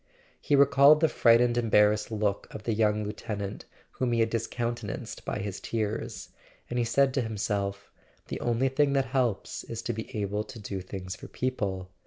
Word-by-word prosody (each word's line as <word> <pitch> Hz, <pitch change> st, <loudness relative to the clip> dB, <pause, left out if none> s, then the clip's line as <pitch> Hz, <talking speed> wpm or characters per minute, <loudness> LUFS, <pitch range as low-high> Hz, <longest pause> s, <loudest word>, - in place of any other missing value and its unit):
He 145 Hz, -, +2 dB
recalled 140 Hz, +2 st, +7 dB
the 160 Hz, -, +4 dB
frightened 120 Hz, -3 st, +4 dB
embarrassed 105 Hz, -2 st, +3 dB
look 105 Hz, -2 st, -1 dB
of 105 Hz, -, -8 dB
the 115 Hz, -, 0 dB
young 105 Hz, -1 st, +2 dB
lieutenant 105 Hz, -1 st, -5 dB, 0.3 s
whom 125 Hz, -2 st, -1 dB
he 115 Hz, -, +1 dB
had 115 Hz, 0 st, +1 dB
discountenanced 120 Hz, +1 st, -3 dB
by -, -, -2 dB
his 100 Hz, -1 st, -4 dB
tears; 110 Hz, +1 st, -3 dB, 0.4 s
and 120 Hz, -, 0 dB
he 120 Hz, -, +2 dB
said 135 Hz, +3 st, +3 dB
to 135 Hz, -, +1 dB
him¬ 110 Hz, -2 st, -4 dB
self: 100 Hz, -1 st, -2 dB, 0.4 s
"The -, -, -4 dB
only 120 Hz, +3 st, +1 dB
thing 140 Hz, +1 st, +2 dB
that 135 Hz, -1 st, +2 dB
helps 120 Hz, -8 st, -1 dB
is 115 Hz, 0 st, -6 dB
to 120 Hz, -, -2 dB
be 110 Hz, 0 st, -6 dB
able 105 Hz, +1 st, -1 dB
to 120 Hz, -, -11 dB
do 100 Hz, -3 st, -5 dB
things 95 Hz, 0 st, -6 dB
for -, -, -10 dB
people. 95 Hz, -8 st, -3 dB
115 Hz, 185 wpm, -28 LUFS, 105-125 Hz, 0.4 s, recalled